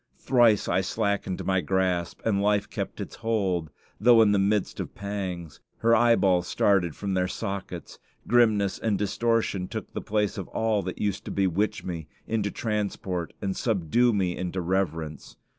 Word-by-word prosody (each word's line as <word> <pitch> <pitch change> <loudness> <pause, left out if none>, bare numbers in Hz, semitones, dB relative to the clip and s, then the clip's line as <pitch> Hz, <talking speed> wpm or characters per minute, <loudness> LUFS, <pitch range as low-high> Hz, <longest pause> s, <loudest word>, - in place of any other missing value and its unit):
Thrice 120 -5 +3
I - - +2
slackened 100 -1 -2
my 95 -1 +2
grasp, 90 -2 -1
and 100 -3 +2
life 105 0 +2
kept - - -5
its - - -6
hold, 95 -8 -1 0.3
though 115 0 +7
in 105 - +4
the 100 - +3
midst 100 +1 0
of - - -5
pangs. 95 -6 -5 0.2
Her 115 0 +4
eyeballs 100 -7 +3
started 90 -6 +2
from 100 -1 -3
their 90 -1 +1
sockets. 95 -2 -5 0.3
Grimness 110 -5 +3
and 110 -3 0
distortion 105 -2 0
took - - -6
the - - -3
place 105 -1 -1
of 95 - -5
all 110 -2 0
that 95 -1 -5
used 100 -1 -2
to - - -5
bewitch 100 +3 0
me 85 -4 -5 0.2
into 110 -2 -1
transport 100 -6 -3
and 95 -1 -1
subdue 115 +3 +2
me 95 -5 0
into 90 +1 -3
reverence. 85 -4 -2
100 Hz, 160 wpm, -26 LUFS, 90-110 Hz, 0.3 s, though